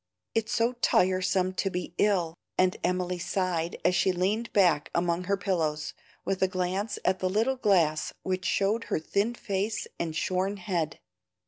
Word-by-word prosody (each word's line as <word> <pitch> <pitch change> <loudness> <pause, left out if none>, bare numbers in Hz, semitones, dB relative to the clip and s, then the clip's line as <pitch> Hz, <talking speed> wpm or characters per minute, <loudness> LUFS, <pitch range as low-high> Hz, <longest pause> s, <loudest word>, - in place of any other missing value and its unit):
It's 225 -1 0
so 230 +2 +2
tiresome 185 0 +2
to 195 +1 0
be 180 -2 -4
ill!" 180 -6 +2 0.2
and 185 0 +3
Emily 180 0 0
sighed 175 -2 -1
as - - +4
she 185 +1 +3
leaned 200 +6 -1
back 175 -7 +3
among 170 +1 +1
her 200 +1 +1
pillows, 160 -6 -1 0.3
with 195 - -1
a 190 - +5
glance 185 +3 -2
at 185 0 +2
the 185 - 0
little 225 +7 +1
glass 175 -10 +2
which 185 0 -2
showed 200 +4 +1
her - - -1
a - - +1
thin 200 +8 0
face 205 0 -2
and 165 -2 -2
shorn 185 +5 0
head. 175 -6 -2
185 Hz, 165 wpm, -28 LUFS, 175-200 Hz, 0.3 s, a